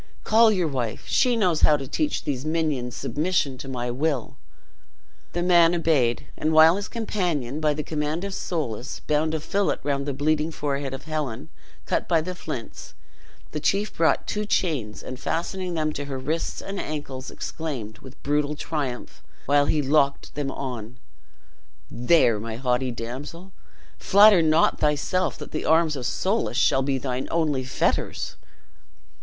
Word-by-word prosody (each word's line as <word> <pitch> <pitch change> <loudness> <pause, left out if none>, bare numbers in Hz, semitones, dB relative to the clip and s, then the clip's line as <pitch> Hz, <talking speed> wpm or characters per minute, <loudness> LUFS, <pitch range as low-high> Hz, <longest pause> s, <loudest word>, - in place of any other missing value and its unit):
Call 225 0 +5
your 185 -5 +1
wife; 125 -6 -3
she 250 -2 +3
knows 180 -8 +2
how 150 - +6
to 135 -2 -7
teach 300 - -1
these 135 -3 -2
minions 155 -6 -1
submission 155 -3 0
to - - -7
my 125 -2 -3
will." 135 -1 -1 1.0
The 175 - -1
man 175 -1 +5
obeyed; 145 -8 +1
and 155 +1 0
while 160 +2 +7
his 205 - -4
companion, 175 - -2
by 155 -1 +1
the 150 - -3
command 155 +3 -2
of 200 -1 -4
Soulis, 140 - -4
bound 155 +1 +1
a - - -1
fillet 195 +6 0
round 140 -1 -1
the 140 - -1
bleeding 155 +2 +1
forehead 140 -3 -3
of - - -10
Helen, 150 -7 -4 0.4
cut - - -1
by 165 - +3
the 180 +4 -4
flints, 155 -9 -7 0.6
the 150 - -3
chief 200 +7 0
brought 165 -1 +2
two 210 - -1
chains, 150 - -1
and 130 -1 -7
fastening 180 +2 -2
them 155 -1 0
to 145 - -4
her 135 -1 -4
wrists 150 +6 -3
and 195 0 -5
ankles, 135 -4 -5
exclaimed, 125 -10 -5
with 130 +1 -14
brutal 145 +1 0
triumph, 145 -5 -4 0.2
while 145 0 +3
he 150 -2 +1
locked 140 0 +1
them 145 -2 -2
on: 125 -4 -6 0.9
"There, 120 -3 +3
my 110 +1 -5
haughty 125 +1 0
damsel, 130 +10 -7 0.5
flatter 200 -2 +7
not 160 +1 +3
thyself 150 +5 0
that - - -9
the 155 - -3
arms 160 -1 +3
of 125 -3 -3
Soulis 195 - 0
shall 135 - +3
be 135 0 0
thine 130 0 -3
only 155 -5 0
fetters." 130 - -1
150 Hz, 160 wpm, -25 LUFS, 130-165 Hz, 1.0 s, while